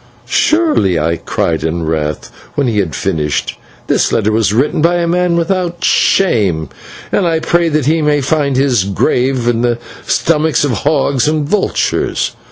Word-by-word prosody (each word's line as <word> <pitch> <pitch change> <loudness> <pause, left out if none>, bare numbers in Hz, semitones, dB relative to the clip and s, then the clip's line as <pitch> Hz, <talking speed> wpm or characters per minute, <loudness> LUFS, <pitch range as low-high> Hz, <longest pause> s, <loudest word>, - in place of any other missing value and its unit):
"Surely," 305 - +2
I 80 +2 0
cried 80 0 -2
in 80 +1 -2
wrath, 75 -2 -3 0.2
when 145 - +1
he 115 -4 0
had 85 -8 -2
finished, 75 -2 -2 0.3
"this - - +1
letter 110 -1 +1
was 110 -2 +1
written 135 +7 +1
by 170 +2 +3
a 175 -1 0
man 175 0 +1
without 175 0 -1
shame, 100 - +2 0.4
and 190 - +1
I 165 -1 +1
pray 170 +1 +1
that 155 -3 0
he 160 +3 +2
may 150 -1 +2
find 145 -1 0
his 130 -6 +2
grave 125 +6 0
in 120 -1 +1
the 120 -1 +1 0.3
stomachs 160 -1 +1
of 140 - -1
hogs 140 0 0
and 150 -1 0
vultures!" 200 +4 0
140 Hz, 165 wpm, -14 LUFS, 100-165 Hz, 0.4 s, by